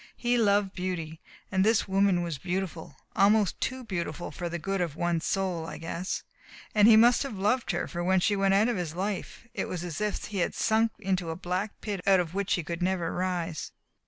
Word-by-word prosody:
"He 245 0 +1
loved 205 -4 +2
beauty. 165 -4 -4 0.3
And 190 -1 +3
this 220 +1 +3
woman 190 -2 +3
was 165 -5 -4
beautiful, 180 -3 -4 0.2
almost 205 -1 +3
too 260 0 -2
beautiful 175 -4 -4
for 175 -1 -4
the 170 - -3
good 195 +3 -2
of 165 -4 -2
one's 170 -1 0
soul, 185 -4 -1
I - - -6
guess. 170 +3 -4 0.5
And 210 0 +6
he 225 - +9
must 240 +2 +6
have 270 -8 -4
loved 210 +2 +1
her, 175 -2 -1
for 175 -1 -4
when 185 +1 +3
she 205 +3 +2
went 195 0 +3
out 210 +3 +4
of 240 -4 0
his 170 -3 -4
life 200 +4 -4
it - - -2
was 175 -1 -4
as 175 +1 -5
if 210 -1 -1
he 200 -2 -4
had 175 - 0
sunk 225 0 +2
into 185 -4 -1
a 160 - -3
black 180 +4 -3
pit 205 -4 -3
out 195 -1 +6
of 170 -2 -2
which 200 0 0
he 175 - -3
could 170 +2 -5
never 180 -2 0
rise. 175 -3 -2
190 Hz, 215 wpm, -28 LUFS, 175-205 Hz, 0.5 s, he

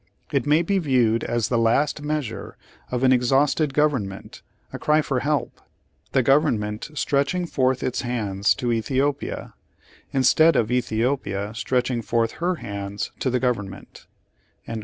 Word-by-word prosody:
It - - 0
may 155 +3 +4
be 195 +3 +1
viewed 125 -8 +2
as 120 -2 -1
the 120 - +1
last 135 +7 +2
measure 150 -6 -4 0.3
of 125 0 -2
an 130 0 +6
exhausted 135 +4 +2
government, 135 -10 -1 0.3
a - - -5
cry 155 0 +2
for 135 -3 -1
help; 145 +2 -2 0.5
the 130 - +2
government 115 -6 +1
stretching 145 +6 0
forth 130 -5 0
its 130 - -1
hands 105 -5 0
to 120 -1 -2
Ethiopia, 135 +5 -2 0.6
instead 155 +4 +4
of 115 -2 +1
Ethiopia 115 -4 -1
stretching 125 +1 -1
forth 115 0 0
her 180 +1 +1
hands 100 -6 -5
to 130 - 0
the 125 0 +1
gov 125 -1 +1
ernment.' 95 -1 -11
125 Hz, 140 wpm, -23 LUFS, 115-145 Hz, 0.6 s, an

